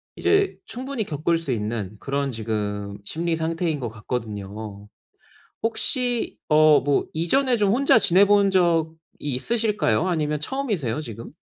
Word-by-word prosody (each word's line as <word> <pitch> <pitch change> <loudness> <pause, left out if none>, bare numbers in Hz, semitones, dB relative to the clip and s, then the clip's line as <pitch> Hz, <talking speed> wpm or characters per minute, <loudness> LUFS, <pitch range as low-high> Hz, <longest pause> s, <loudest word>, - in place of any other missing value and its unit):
이제 400 -1 +2
충분히 255 -1 -4
겪을 160 +2 0
수 145 -5 -4
있는 105 -2 -3
그런 140 0 -2
지금 105 -2 -3
심리 165 +4 -1
상태인 160 -1 -1
것 120 -3 -3
같거든요. 105 -2 -6 0.8
혹시 245 +1 -1
어 155 -1 +6
뭐 145 -1 +1
이전에 245 - +2
좀 205 -2 +2
혼자 265 -2 +5
지내본 200 +1 +5
적이 165 -3 +2 0.2
있으실까요? 185 - 0
아니면 150 -3 0
처음이세요, 180 - -2
지금? 115 -4 -8
155 Hz, 285 characters per minute, -24 LUFS, -, 0.8 s, 어